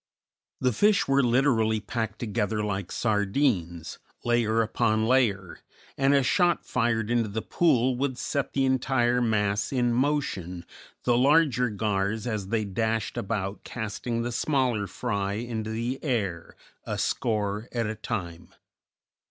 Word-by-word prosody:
The 125 -2 +1
fish 205 - +3
were 135 0 +4
literally 120 -3 +2
packed 110 0 -3
together 105 -2 -1
like 100 -3 -3
sardines, 105 - 0 0.3
layer 115 -1 +2
upon 110 0 +1
layer, 110 -7 +1 0.4
and 135 +1 +3
a 140 - +4
shot 175 +5 +2
fired 115 -2 0
into 115 -3 +1
the 110 +2 -3
pool 130 -7 +2
would 130 -1 -1
set 140 0 -2
the 135 -1 +2
entire 125 -2 +2
mass 105 -3 +1
in 120 -3 +1
motion, 115 - -1 0.4
the 120 - +3
larger 135 -1 +4
gars 105 0 -1
as 105 -5 -3
they 110 +1 0
dashed 110 +2 -1
about 100 -1 -3
casting 115 +1 -3
the 120 - -2
smaller 125 -5 0
fry 100 +1 -2
into 110 0 -4
the 115 +4 -3
air, 100 - -2 0.3
a - - -4
score 105 0 -1
at 115 -2 -1
a 110 - -2
time. 90 -6 -5
115 Hz, 135 wpm, -27 LUFS, 105-125 Hz, 0.4 s, were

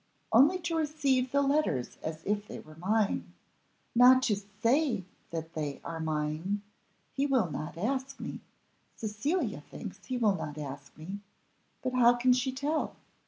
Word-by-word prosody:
only 280 +11 +6
to 345 -2 -2
receive 285 -5 +1
the 280 0 +3
letters 275 - +1
as 160 0 -5
if 205 +1 0
they - - -7
were 155 - -13
mine. 210 +4 0 0.6
Not 255 +2 +7
to 215 - +3
say 220 +4 +1 0.3
that 165 0 -5
they 150 -4 -3
are 165 -1 -5
mine; 160 +6 -1 0.5
he 275 +1 +1
will 250 - +2
not 155 +3 -5
ask 265 +7 -2
me, - - -5 0.6
Cecilia 220 - -1
thinks 200 -1 -8
he 255 - -1
will 220 -4 +4
not 155 -4 -5
ask 140 -1 -7
me. 185 +6 -6 0.6
But 255 0 -1
how 245 -1 +6
can 250 +1 +4
she 255 +1 +1
tell? 285 +4 -1
220 Hz, 155 wpm, -30 LUFS, 165-265 Hz, 0.6 s, Not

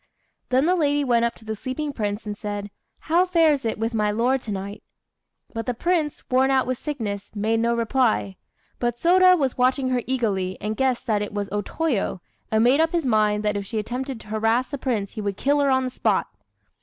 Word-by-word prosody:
Then 260 +3 +3
the 355 - +3
lady 290 -3 +1
went 235 -3 +2
up 235 - -2
to 220 - -17
the 220 0 -3
sleeping 280 +6 -4
prince 210 -3 -3
and 210 -1 -4
said, 205 -1 -5 0.3
"How 335 +3 +3
fares 325 -7 +3
it 225 - -1
with 225 +2 -2
my 210 -2 +1
lord 245 +5 +1
to 220 - -6
night?" 200 +1 -5 0.7
But 225 +1 -4
the 250 - -1
Prince, 320 +1 -1
worn 260 +1 +3
out 265 -1 +3
with 255 -1 -2
sickness, 220 -9 -4
made 220 +2 +1
no 235 +1 +1
reply. 230 -4 +1 0.4
But 240 -1 0
Sôda 365 +6 +5
was 270 -5 -1
watching 255 +1 +2
her 250 -1 +1
eagerly, 200 -8 -1
and 215 +1 -3
guessed 260 0 0
that 210 -2 +1
it 205 0 -5
was 205 -1 -2
O 205 0 0
Toyo, 245 - -1 0.3
and 220 0 +2
made 255 +5 +4
up 325 +1 +2
his 335 -4 0
mind 215 -3 +2
that 210 -1 0
if 200 - -2
she 220 +3 -5
attempted 250 +4 -4
to - - -14
harass 225 +4 +1
the 280 - -4
Prince 225 -7 -2
he 215 - -6
would 200 -1 -3
kill 285 +1 +2
her 280 -1 +3
on 260 0 +3
the 255 - -3
spot. - - +1
240 Hz, 220 wpm, -23 LUFS, 210-270 Hz, 0.7 s, Sôda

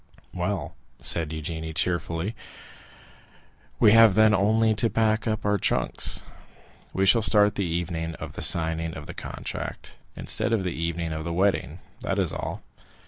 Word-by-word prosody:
'" - - -28
50035m - - -6
"Well," 90 -3 -2 0.3
said 80 -3 0
Eugénie 80 0 -5
cheerfully, 85 +4 -1 1.4
"we 105 - +6
have 115 -3 +7
then 110 0 +5
only 110 +3 +3
to 115 +2 0
pack 110 0 +1
up 110 -1 -2
our 105 -1 +2
trunks; 60 - +1 0.7
we 95 - +1
shall 115 +4 +5
start 105 -1 +4
the 100 -2 -2
evening 80 -1 -3
of - - -8
the - - -7
signing 80 0 0
of 75 - -8
the - - -8
contract, - - -7 0.2
instead 115 - +1
of 105 -4 +1
the 90 -2 -2
evening 85 0 -3
of 80 0 -4
the 85 +1 -3
wedding—that 90 -3 -2
is - - 0
all." - - -5
90 Hz, 160 wpm, -25 LUFS, 80-105 Hz, 1.4 s, have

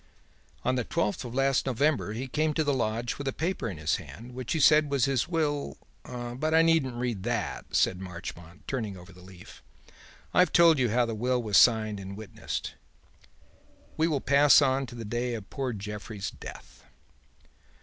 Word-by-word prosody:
"'On 130 - +2
the 125 -1 0
twelfth 105 -2 -1
of 120 0 -7
last 135 0 +2
November 135 -3 +1
he 125 +4 -4
came 155 +3 0
to 160 - +2
the 145 -1 +1
lodge 120 0 -2
with 140 - -4
a - - +1
paper 165 -4 -2
in 95 - -7
his 75 0 0
hand 120 +3 -11
which 125 -1 -4
he 160 - 0
said 150 0 +5
was 140 -3 +2
his 135 -4 0
will' 150 -4 -1 0.3
But 125 +5 -3
I 165 - +6
needn't 160 -7 +2
read 120 -5 -2
that," - - -3
said 90 0 +2
Marchmont, 85 -2 -9
turning 110 -7 -3
over 90 +2 -13
the 90 - -16
leaf, 90 -1 -14 0.7
"I've 180 -2 +4
told 170 -3 +6
you 125 -2 +2
how 120 +3 +2
the 115 - -3
will 125 +3 0
was 105 -3 -1
signed 110 -3 +4
and 100 0 -8
witnessed. 110 -2 -5 1.2
We 160 - +2
will 145 -5 0
pass 140 +1 +6
on 135 -1 +1
to 120 - -10
the 115 -1 -6
day 120 +3 -2
of 105 -3 -9
poor 135 -3 -2
Jeffrey's 105 -1 -6
death. - - -12
125 Hz, 185 wpm, -28 LUFS, 105-140 Hz, 1.2 s, I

